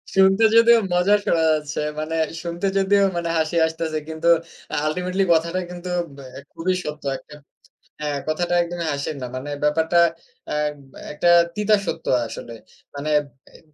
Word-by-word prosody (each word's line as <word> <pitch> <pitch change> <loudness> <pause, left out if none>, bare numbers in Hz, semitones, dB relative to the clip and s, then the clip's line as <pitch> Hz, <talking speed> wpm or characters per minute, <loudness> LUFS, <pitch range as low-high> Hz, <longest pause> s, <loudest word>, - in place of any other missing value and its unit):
শুনতে 195 +3 +5
যদিও 230 0 +7
মজা 180 +4 +4
শোনা 165 - +2
যাচ্ছে। 150 0 -3 0.2
মানে 155 +1 -3 0.3
শুনতে 170 +3 -2
যদিও 200 +1 +3
মানে 170 -1 -2
হাসি 160 +1 0
আসতেছে 160 -1 -3
কিন্তু 160 +1 -3 0.5
আ - - 0
আল্টিমেটলি 180 +4 0
কথাটা 170 +3 0
কিন্তু 180 0 -7
উব 170 - -12 0.2
অ্যা 135 - -9
খুবই 185 +3 -1
সত্য 150 0 -6
একটা। 150 - -15 0.7
হ্যাঁ, 150 -1 -2
কথাটা 175 +3 0
একদমই 170 -1 -4
হাসির 140 +2 -3
না। - - -3
মানে 135 +3 -6
ব্যাপারটা 160 +3 +3 0.5
অ্যা - - -2 0.6
একটা 150 +4 0 0.3
তিতা 210 0 +3
সত্য 165 - -4 0.2
আসলে। 115 +1 -8 0.4
মানে 145 +2 -4 0.4
অ্যা - - -18
170 Hz, 155 wpm, -22 LUFS, 155-180 Hz, 0.7 s, যদিও